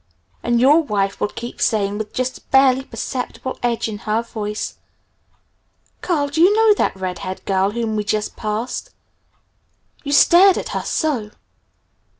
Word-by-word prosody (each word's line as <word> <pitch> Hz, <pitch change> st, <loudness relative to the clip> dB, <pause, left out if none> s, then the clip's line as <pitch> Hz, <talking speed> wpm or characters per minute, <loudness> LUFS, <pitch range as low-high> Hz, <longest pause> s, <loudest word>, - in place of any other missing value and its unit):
And 240 Hz, 0 st, +1 dB
your 290 Hz, +6 st, +5 dB
wife 200 Hz, -8 st, -2 dB
will -, -, +2 dB
keep 235 Hz, +3 st, -8 dB
saying, 205 Hz, -2 st, +1 dB
with 215 Hz, -1 st, -5 dB
just 255 Hz, 0 st, -2 dB
a -, -, -28 dB
barely 265 Hz, -1 st, +4 dB
perceptible 260 Hz, 0 st, -5 dB
edge 235 Hz, -2 st, 0 dB
in 210 Hz, -2 st, -6 dB
her 215 Hz, +2 st, -1 dB
voice, 210 Hz, -2 st, -5 dB, 1.2 s
'Carl, 295 Hz, -6 st, 0 dB
do 315 Hz, +3 st, -1 dB
you 365 Hz, +4 st, +7 dB
know 445 Hz, -1 st, +5 dB
that 410 Hz, -, 0 dB
red 185 Hz, -1 st, -4 dB
haired 185 Hz, 0 st, -6 dB
girl 195 Hz, 0 st, +1 dB
whom 225 Hz, 0 st, -2 dB
we 210 Hz, -, -1 dB
just 210 Hz, 0 st, -2 dB
passed? 215 Hz, +3 st, -4 dB, 1.1 s
You 285 Hz, -, -4 dB
stared 360 Hz, +6 st, +6 dB
at -, -, -4 dB
her -, -, -2 dB
so!' 265 Hz, -10 st, -1 dB
235 Hz, 155 wpm, -20 LUFS, 210-280 Hz, 1.2 s, you